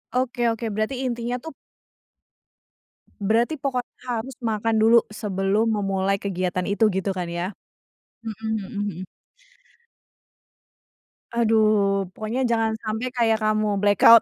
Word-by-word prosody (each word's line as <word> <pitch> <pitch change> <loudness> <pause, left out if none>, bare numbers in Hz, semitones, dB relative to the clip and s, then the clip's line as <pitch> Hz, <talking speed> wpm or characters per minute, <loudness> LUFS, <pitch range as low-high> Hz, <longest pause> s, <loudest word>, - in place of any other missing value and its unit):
Oke 250 -1 +1
oke, 225 -1 -1
berarti 215 +6 -2
intinya 240 -1 -2
tuh 320 +6 -7 1.7
berarti 230 +9 +1
pokoknya 260 -3 -3
harus 245 +3 -3
makan 225 0 0
dulu, 230 +2 +7
sebelum 205 0 0
memulai 195 -1 0
kegiatan 185 -1 -1
itu 205 +2 +1
gitu 190 +1 -1
kan 175 -1 -2
ya? 175 +1 -2 0.8
Mhm 220 0 -5
mhm 200 +1 -6 0.2
mhm. - - -7 2.3
Aduh! 215 -4 +3
Pokoknya 220 +4 -2
jangan 225 -1 +2
sampai 220 +3 -2
kayak 225 -2 +3
kamu 215 0 +2 0.2
black 205 -2 +3
out. 230 0 +10
220 Hz, 120 wpm, -24 LUFS, 200-235 Hz, 2.3 s, out